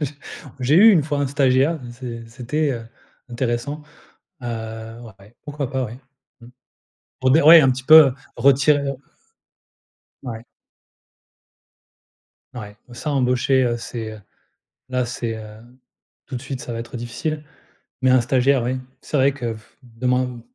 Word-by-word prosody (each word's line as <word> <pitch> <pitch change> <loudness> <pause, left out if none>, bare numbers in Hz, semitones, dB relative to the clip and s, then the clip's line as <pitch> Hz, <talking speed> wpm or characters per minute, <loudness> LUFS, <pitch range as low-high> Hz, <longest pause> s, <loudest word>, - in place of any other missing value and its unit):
J 145 0 -2 0.5
j'ai 130 +4 +2
eu 220 +5 +8
une 165 - +4
fois 145 -1 -2
un 140 - +1
stagiaire 135 +3 +2
et 120 - -9
c'est 120 -1 -8
c'était, 135 +5 -2
heu, 115 -2 -7 0.4
intéressant, 120 +5 -3 0.6
heu, - - -5 0.6
ouais, 115 -2 -12
ouais, 110 +4 -20
pourquoi 145 -3 -4
pas, 130 -1 -1
ouais. 115 +3 -9 0.4
Mmh. 120 - -13 0.7
Pour 130 0 +2
dire, 155 +2 +4
ouais, 165 0 +10
un 135 -2 +4
petit 130 +1 -4
peu, 155 -1 +9
heu, 125 - -5 0.2
retirer 140 +1 +4 1.4
Ouais. 115 -2 -7 2.1
Ouais, 105 -3 -9 0.2
ça 150 +5 -5
embaucher, 130 0 +2
heu, 120 -1 0
c'est, 115 -1 -6
heu, 110 - -11 0.7
là, 125 -1 -1
c'est, 115 -1 -4
heu, 110 - -8 0.8
tout 130 - -6
de - - -6
suite, 135 -2 -6
ça 120 - -6
va 115 - -4
être 120 +1 -7
difficile, 150 +6 -4 0.6
mais 130 -1 +4
un 130 -1 +5
stagiaire, 130 +2 +2
oui, 125 +2 -1 0.2
c'est 150 - -2
vrai 135 +1 +4
que 120 -5 -4
pff 110 0 -17
demain, 125 +1 -2
130 Hz, 155 wpm, -21 LUFS, 120-140 Hz, 2.1 s, ouais